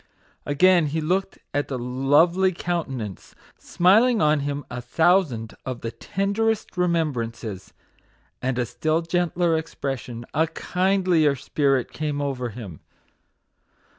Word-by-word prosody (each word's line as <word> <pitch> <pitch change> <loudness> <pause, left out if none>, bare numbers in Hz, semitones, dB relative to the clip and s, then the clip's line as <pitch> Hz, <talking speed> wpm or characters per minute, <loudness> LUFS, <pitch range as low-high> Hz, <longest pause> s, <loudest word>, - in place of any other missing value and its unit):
Again 175 +3 +4
he 155 +3 -2
looked 185 +5 -1 0.2
at 145 0 0
the 135 - -3
lovely 145 +9 +3
countenance, 135 - -4 0.2
smiling 220 +7 +4
on 150 -1 +3
him 145 0 -3
a 125 0 -6
thousand 145 -4 +2
of 130 -2 -5
the 115 - -4
tenderest 200 - -1
remembrances, 125 - -2 0.7
and 130 -1 -1
a 125 - +1
still 155 +8 -1
gentler 175 0 +1
expression, 135 -7 -4
a 160 +2 +2
kindlier 180 -4 +1
spirit, 135 -1 0
came 150 -2 -2
over 135 -4 -2
him. 100 -8 -9
150 Hz, 115 wpm, -24 LUFS, 125-175 Hz, 0.7 s, Again